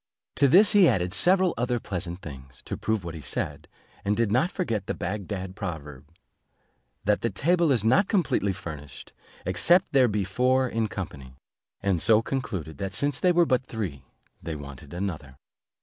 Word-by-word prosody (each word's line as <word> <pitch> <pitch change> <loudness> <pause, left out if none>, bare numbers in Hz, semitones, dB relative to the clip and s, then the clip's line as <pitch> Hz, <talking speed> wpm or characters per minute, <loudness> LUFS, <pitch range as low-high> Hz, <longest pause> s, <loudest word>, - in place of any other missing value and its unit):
To 140 - +5
this 195 +9 +6
he 200 -4 +6
added 90 -1 0
several 185 - +4
other 120 0 0
pleasant 90 -3 -5
things, 70 -3 -10
to - - -4
prove 110 -3 -1
what 85 -1 -6
he 80 - -8
said, - - -2 0.4
and 105 +1 0
did 115 -3 +1
not 145 +10 +2
forget 115 - -3
the - - -2
Bagdad 95 -2 -4
proverb, 75 -6 -7 1.0
"That 105 0 +1
the 115 - 0
table 165 - +2
is 120 -6 +2
not 130 - +4
completely 170 - +1
furnished, 75 -7 -9 0.3
except 170 - +3
there 130 -2 +5
be 105 -2 -1
four 130 +7 +2
in 115 -2 -1
company:" 70 -11 -7 0.5
and 95 -4 +1
so 110 0 +5
concluded, 100 - -4
that 95 -1 -3
since 145 -1 0
they 180 - +4
were 175 0 +4
but 130 -3 0
three, 95 - -5 0.4
they 80 - -5
wanted 70 0 -10
another. 85 -7 -5
100 Hz, 170 wpm, -26 LUFS, 85-130 Hz, 1.0 s, this